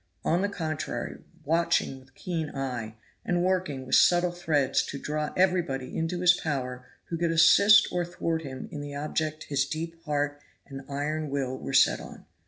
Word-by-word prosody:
On 170 +3 +2
the 200 - 0
contrary, 160 -5 -4 0.3
watching 165 -3 +1
with 130 0 -22
keen 165 -4 -3
eye, 125 -5 -4 0.3
and 175 0 0
working 180 -8 -1
with 130 - -6
subtle 175 0 +5
threads 155 -6 +1
to 140 - -5
draw 150 +1 -3
everybody 175 -8 +1
into 165 +2 -2
his 180 -1 +7
power 130 -7 -4 0.2
who 165 - -2
could 170 -1 +1
assist 165 +6 +6
or 180 -1 0
thwart 165 -1 -2
him 130 -4 -7
in 145 - -5
the 145 0 -7
object 155 +1 -2
his 140 -2 0
deep 165 +2 -5
heart 145 -1 -1 0.2
and 135 -1 -8
iron 150 +2 -2
will 135 -2 -2
were 135 - -6
set 135 - +5
on. - - -11
155 Hz, 175 wpm, -27 LUFS, 135-170 Hz, 0.3 s, his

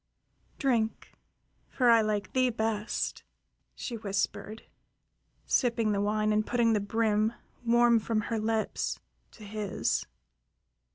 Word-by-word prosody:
"Drink, 235 -5 0 0.6
for 245 -2 +3
I 230 -1 +6
like 210 -2 -2
thee 255 -1 +3
best," 220 -2 -2 0.5
she 235 - -5
whispered, 210 +1 -3 0.8
sipping 230 -3 +2
the 200 -1 0
wine 215 +1 +1
and 215 0 +2
putting 235 0 +2
the 210 - +2
brim, 215 +1 +1 0.3
warm 235 0 +4
from 220 0 -1
her 225 +1 -2
lips, 220 0 -1 0.3
to 215 - -13
his. 205 -2 -2
220 Hz, 115 wpm, -29 LUFS, 210-230 Hz, 0.8 s, I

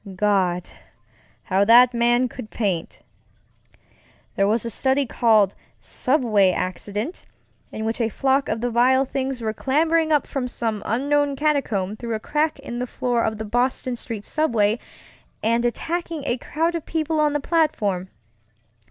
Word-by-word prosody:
Gad, 185 -3 +1 0.8
how 195 0 +2
that 240 +3 +7
man 240 +1 +2
could 245 -2 -9
paint! 190 -7 -3 1.3
There 195 - +2
was 225 +3 0
a 230 - -2
study 265 +4 +1
called 220 -5 +3 0.3
Subway 230 -8 +2
Accident, 205 - -4 0.4
in 220 - -5
which 225 +2 -2
a 225 - +1
flock 270 +4 +1
of 220 +1 -2
the 245 0 -1
vile 260 +3 +4
things 265 -1 -3
were 220 -1 -1
clambering 315 +5 +1
up 295 -2 +3
from 265 -3 -3
some 225 -4 -3
unknown 285 +4 +1
catacomb 255 -10 0
through 230 -1 -3
a - - -3
crack 300 +7 -1
in 260 -4 -7
the 250 - -2
floor 240 -1 -1
of 220 -1 -1
the 220 - -5
Boylston 245 +3 0
Street 225 -3 -7
subway 230 -8 +1 0.6
and 230 +2 +2
attacking 330 +5 -2
a 245 - 0
crowd 325 +7 -1
of 335 -2 -5
people 315 -1 -1
on 300 -1 +2
the 295 - 0
platform. 220 - 0
240 Hz, 150 wpm, -23 LUFS, 215-285 Hz, 1.3 s, that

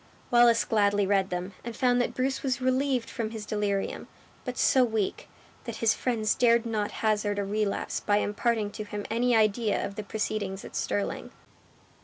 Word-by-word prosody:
Wallace 240 -1 +5
gladly 205 -2 +2
read 195 -1 +2
them, 180 +2 -4
and 235 -1 -6
found 245 -2 +3
that - - -2
Bruce 265 +1 -1
was 255 -3 -1
relieved 255 -1 +1
from 230 -3 -3
his 220 -1 -7
delirium; 205 -2 -2 0.4
but 250 -1 -4
so 260 - +4
weak, 220 -5 -2 0.4
that 235 -3 -5
his 225 -1 +2
friends 225 -4 0
dared 235 -1 +3
not 215 -3 -1 0.2
hazard 210 -1 +1
a 200 - -1
relapse 205 0 -1
by 205 - +1
imparting 210 +1 0
to 215 - -6
him 205 0 -6
any 240 +1 +2
idea 215 0 +2
of 200 - -6
the 215 - -5
proceedings 205 -2 -3
at - - -10
Stirling. 200 - -2
215 Hz, 175 wpm, -28 LUFS, 205-240 Hz, 0.4 s, Wallace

